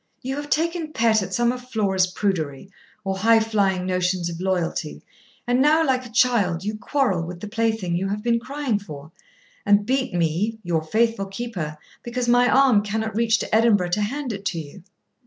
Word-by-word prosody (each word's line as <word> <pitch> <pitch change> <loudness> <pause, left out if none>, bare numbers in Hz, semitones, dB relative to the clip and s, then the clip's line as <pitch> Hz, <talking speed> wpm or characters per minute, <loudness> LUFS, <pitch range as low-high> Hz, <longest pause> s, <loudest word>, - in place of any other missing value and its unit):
You 265 +2 -3
have 290 0 -6
taken 330 0 -1
pet 225 -2 +3
at 190 0 -5
some 240 +4 +2
of 250 0 -8
Flora's 195 -5 +1
prudery, 180 -3 -3 0.3
or 190 -1 -2
high 225 +2 +5
flying 200 -4 0
notions 180 -1 0
of 165 - -7
loyalty, 175 -4 -2 0.4
and 245 +1 +2
now, 310 +3 +4
like 255 -2 0
a - - -16
child, 215 -8 +2
you 210 +2 -3
quarrel 215 - 0
with 170 +1 -6
the 210 - -7
plaything 220 -5 -1
you 190 +3 -1
have 205 +2 -3
been 235 -1 +2
crying 260 -3 -2
for, 155 -5 -10 0.5
and 205 0 +3
beat 260 0 0
me, 175 +7 0
your 170 -3 0
faithful 220 +4 0
keeper, 195 -7 -5 0.2
because 240 0 -3
my 245 +1 +4
arm 260 -6 +5
cannot 220 +1 -3
reach 225 0 +3
to - - -1
Edinburgh 215 -5 +3
to 210 +4 0
hand 255 +3 -3
it 200 -1 -7
to 175 -3 -1
you. 155 +5 -10
210 Hz, 190 wpm, -23 LUFS, 185-240 Hz, 0.5 s, high